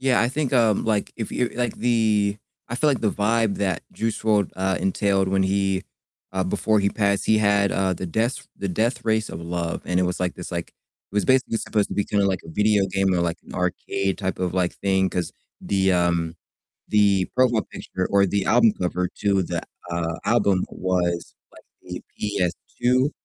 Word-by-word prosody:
Yeah, 130 -1 +3
I 120 - +2
think, 140 0 -2
um, 115 -5 +3
like, 110 -2 0
if 110 - -4
you 125 -1 0
like 120 0 -1
the 110 -4 +2 0.3
I 115 - -4
feel 150 +3 +2
like 135 - 0
the 105 - +2
vibe 110 0 +1
that 95 -4 -1
Juice 110 -1 -2
WRLD, 105 -3 +2
uh, 95 0 0
entailed 95 +1 +1
when 95 0 +2
he 95 0 +1 0.5
uh 95 -1 0
before 105 +3 +1
he 100 - +2
passed, 100 -1 0
he 110 - +4
had, 100 -2 +3
uh, 95 -1 +1
The 90 - -5
Death 115 +9 -1
The 100 - -3
Death 115 +6 0
Race 110 -1 +1
of 80 - -7
Love, 85 0 -3
and 90 0 +1
it - - +3
was 90 0 -2
like 90 -1 -1
this, 90 - -8
like 85 -2 -3
it - - -27
was 105 - +2
basically 130 -3 +2
supposed 105 -2 0
to - - -5
be 100 - +1
kinda 100 -1 +1
like 95 -2 0
a - - -12
video 105 +2 +2
game 95 -1 +1
or 90 - +1
like 85 0 -1
an - - -11
arcade 90 +2 -1
type 95 -2 -2
of, 90 -1 -1
like, 90 -1 +1
thing, 95 -1 +1
'cause 90 -2 -2 0.3
the, 95 -1 +1
um 85 -2 +1 0.5
the 100 -3 +3
profile 125 -4 +3
picture 90 0 -3
or 100 0 +4
the 100 +1 0
album 115 -2 +5
cover 90 0 0
to 100 -2 +2
the, - - -3 0.3
uh, 85 -1 -2
album 100 -5 +2
was 90 -2 -1 0.2
like - - -17 0.3
a - - -5 0.2
PS2 120 - 0
100 Hz, 200 wpm, -23 LUFS, 90-110 Hz, 0.5 s, album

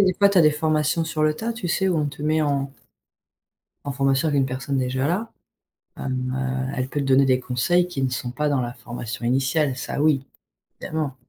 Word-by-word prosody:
y - - +6
a - - +4
des 185 - +2
fois, 200 0 +6
tu 200 - +3
as - - +8
des 155 -2 +6
formations 155 +1 +1
sur 160 -1 -2
le 155 0 +2
tas, 225 +8 -3
tu 225 -5 -5
sais, 190 +3 +1
où 180 - +1
on 150 - +1
te 145 +1 -9
met 155 +1 +2
en 140 -2 0 1.1
en 140 - -3
formation 135 +3 +1
avec 145 -2 +1
une 135 - +3
personne 130 +1 -2
déjà 130 +1 0
là, 210 +7 -1 0.7
hem, 130 -1 -2
heu, 130 0 -2
elle 130 0 -1
peut 145 - -2
te 140 - -2
donner 135 +1 +5
des 130 -1 +3
conseils 130 +9 +1
qui 140 -7 -4
ne 130 - +1
sont 125 0 -3
pas 150 +4 -1
dans 140 -3 +1
la 120 -1 -3
formation 120 -1 -7
initiale, 135 +3 +1
ça 140 - -3
oui, 140 -3 +2 0.5
évidemment. 155 -4 -3
140 Hz, 235 wpm, -23 LUFS, 130-155 Hz, 1.1 s, as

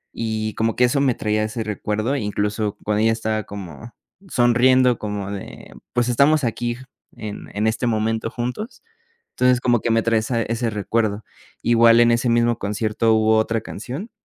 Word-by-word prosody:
Y 110 -1 -2
como 110 +1 -1
que 125 - +2
eso 135 +3 +2
me 130 -4 +2
traía 105 0 0
ese 110 +1 -3
recuerdo, 110 +4 -2
incluso, 105 -2 -2
cuando 105 0 0
ella 115 +1 +3
estaba 110 -1 -2
como 100 +3 -9 0.4
sonriendo 125 -1 +4
como 105 -2 -4
de: 100 -2 -9 0.2
"Pues, 120 -1 +1
estamos 140 +5 +3
aquí, 120 0 -2 0.4
en 105 -2 -8
en 105 +2 0
este 115 +2 0
momento, 110 0 -1
juntos". 125 - -5 0.5
Entonces, 125 -1 +2
como 120 -2 +2
que 120 - -2
me 115 0 +3
trae 115 0 +2
esa 115 +1 -1
ese 115 +1 -2
recuerdo. 105 0 -1 0.4
Igual, 115 0 +5
en 120 0 +5
ese 115 +1 +1
mismo 120 0 +2
concierto, 110 +2 0
hubo 110 0 +3
otra 110 +1 0
canción, 130 - -7
115 Hz, 170 wpm, -21 LUFS, 110-120 Hz, 0.5 s, Igual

